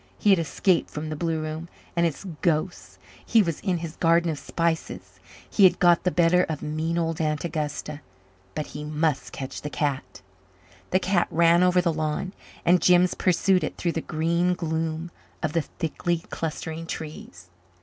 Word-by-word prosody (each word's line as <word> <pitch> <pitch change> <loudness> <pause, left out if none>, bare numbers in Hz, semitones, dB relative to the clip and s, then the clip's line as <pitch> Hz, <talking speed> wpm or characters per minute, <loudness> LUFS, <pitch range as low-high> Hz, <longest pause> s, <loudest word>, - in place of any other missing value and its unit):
He 205 - +3
had 190 - +5
escaped 170 +3 +1
from 155 +1 -5
the 155 - -3
blue 165 0 -1
room 155 +2 -5 0.3
and 170 0 +3
its 160 - -5 0.2
ghosts; 170 +2 -1 0.3
he 225 -2 +4
was 165 -4 -2
in 185 -4 0
his 165 -1 -6
Garden 170 0 +3
of 150 - -5
Spices; 165 +3 -3 0.3
he 205 - +2
had 185 - +7
got 175 -2 +5
the - - +4
better 175 0 +4
of 155 -3 -5
mean 160 +2 -2
old 165 -1 -1
Aunt 155 0 -1
Augusta. 150 -2 -4 0.5
But 155 - -2
he 150 - -8
must 150 -1 -1
catch 135 -1 -6
the 150 - -4
cat. 145 -7 -3 0.7
The 185 - +3
cat 190 -1 +1
ran 170 +1 +4
over 180 0 +4
the 170 -2 +1
lawn 155 +4 -2 0.3
and 180 +1 +5
Jims 180 0 +5
pursued 185 +1 +2
it - - -4
through 170 - 0
the 165 - -2
green 170 +4 0
gloom 160 0 -3 0.3
of 155 -2 -1
the 165 - +2
thickly 165 +2 -3
clustering 160 +1 -4
trees. 90 - -8
165 Hz, 175 wpm, -25 LUFS, 155-175 Hz, 0.7 s, had